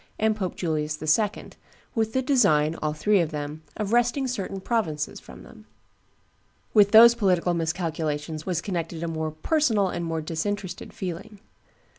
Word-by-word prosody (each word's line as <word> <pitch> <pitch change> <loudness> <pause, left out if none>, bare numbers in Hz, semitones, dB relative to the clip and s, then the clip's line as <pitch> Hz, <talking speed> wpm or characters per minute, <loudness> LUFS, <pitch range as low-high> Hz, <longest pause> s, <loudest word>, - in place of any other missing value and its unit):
and 220 0 +1
Pope 190 -4 -3
Julius 155 -3 -2
II., 200 +7 0 0.4
with 220 -2 -1
the 260 - +1
design, 160 - +3
all 155 - 0
three 205 +6 +2
of 165 -3 +1
them, 150 0 -5 0.2
of 210 +1 -2
wresting 240 +3 +2
certain 195 -5 -4
provinces 185 -8 -2
from - - -13
them. - - -16 1.1
With 205 -2 +6
those 230 +2 +9
political 185 -6 +1
miscalculations 160 -2 -2
was 175 -2 -2
connected 170 -3 -4
a - - -2
more 160 -1 -2
personal 210 - +1
and 175 - -4
more 165 -1 -2
disinterested 185 +5 -4
feeling. 190 +3 -7
180 Hz, 150 wpm, -25 LUFS, 155-215 Hz, 1.1 s, those